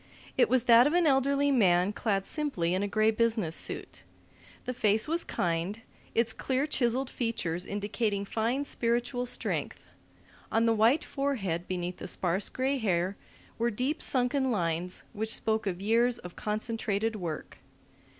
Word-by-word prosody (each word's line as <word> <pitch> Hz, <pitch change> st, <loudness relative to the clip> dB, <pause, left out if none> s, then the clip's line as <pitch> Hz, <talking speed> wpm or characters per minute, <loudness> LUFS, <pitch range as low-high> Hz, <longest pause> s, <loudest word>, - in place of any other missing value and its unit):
It -, -, +4 dB
was 255 Hz, -3 st, +3 dB
that 240 Hz, +1 st, +7 dB
of 300 Hz, -, 0 dB
an 350 Hz, -1 st, +3 dB
elderly 280 Hz, 0 st, +3 dB
man 190 Hz, -5 st, +3 dB
clad 200 Hz, -3 st, -1 dB
simply 230 Hz, -, -1 dB
in 185 Hz, -, 0 dB
a 205 Hz, -, 0 dB
gray 215 Hz, +1 st, +3 dB
business 220 Hz, -7 st, 0 dB
suit. -, -, -2 dB, 0.6 s
The 250 Hz, -, -2 dB
face 215 Hz, -2 st, +3 dB
was 335 Hz, +2 st, 0 dB
kind, 175 Hz, +5 st, -2 dB, 0.4 s
its 230 Hz, 0 st, +3 dB
clear 265 Hz, +2 st, -1 dB
chiselled 260 Hz, -3 st, 0 dB
features 180 Hz, -8 st, -3 dB
indicating 205 Hz, 0 st, -2 dB
fine 235 Hz, +7 st, -1 dB
spiritual 245 Hz, +1 st, -1 dB
strength; 245 Hz, -, -2 dB, 0.6 s
on 225 Hz, +1 st, +3 dB
the 230 Hz, -, +4 dB
white 230 Hz, +8 st, +3 dB
forehead 205 Hz, -, -2 dB
beneath 180 Hz, -1 st, -3 dB
the -, -, -7 dB
sparse 185 Hz, +1 st, 0 dB
gray 265 Hz, +1 st, -1 dB
hair 185 Hz, -3 st, 0 dB, 0.4 s
were 235 Hz, +1 st, +2 dB
deep 255 Hz, +8 st, -2 dB
sunken 265 Hz, +1 st, +1 dB
lines 175 Hz, -4 st, -1 dB
which 220 Hz, +1 st, -2 dB
spoke 220 Hz, -1 st, -1 dB
of 185 Hz, 0 st, -3 dB
years 235 Hz, +3 st, +3 dB
of 180 Hz, -1 st, -10 dB
concentrated 220 Hz, 0 st, -2 dB
work. 170 Hz, -6 st, -6 dB
225 Hz, 150 wpm, -29 LUFS, 195-250 Hz, 0.6 s, that